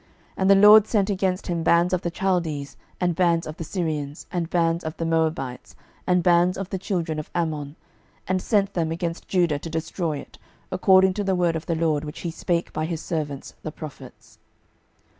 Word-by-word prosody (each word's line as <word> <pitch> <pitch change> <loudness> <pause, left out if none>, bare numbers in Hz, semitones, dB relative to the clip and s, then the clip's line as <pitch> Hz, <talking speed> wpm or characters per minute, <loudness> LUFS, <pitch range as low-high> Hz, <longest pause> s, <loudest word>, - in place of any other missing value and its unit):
12:024:002 - - -33
And 190 0 +2
the 200 - +8
LORD 210 +2 +8
sent 205 -3 +1
against 190 -1 -1
him 170 -2 -2
bands 170 +2 +3
of 180 - +1
the 175 - -2
Chaldees, 165 -7 -1 0.2
and 180 -1 +1
bands 170 -1 +2
of 155 - -7
the - - -5
Syrians, 155 -4 -3
and 170 -2 -2
bands 170 -1 +1
of 160 +1 -5
the 165 - -2
Moabites, 160 -6 -1 0.3
and 180 -1 +3
bands 175 +1 +4
of 195 -1 -5
the 190 - -2
children 170 -5 -2
of 155 - -7
Ammon, 155 -4 -2 0.5
and 185 0 0
sent 200 -2 +1
them 165 -2 -1
against 170 0 -4
Judah 175 -6 +1
to 165 - -7
destroy 160 0 -2
it, - - -12 0.3
according 185 0 +5
to 205 - -2
the 190 -1 +1
word 175 -2 +1
of 160 - -5
the 165 - 0
LORD, 160 -2 +1
which 150 -1 -7
he 170 - -3
spake 170 +1 -2
by 155 - -1
his 165 -1 -3
servants 150 -5 -4
the 155 - -5
prophets. 150 -2 -11
170 Hz, 200 wpm, -24 LUFS, 160-185 Hz, 0.5 s, the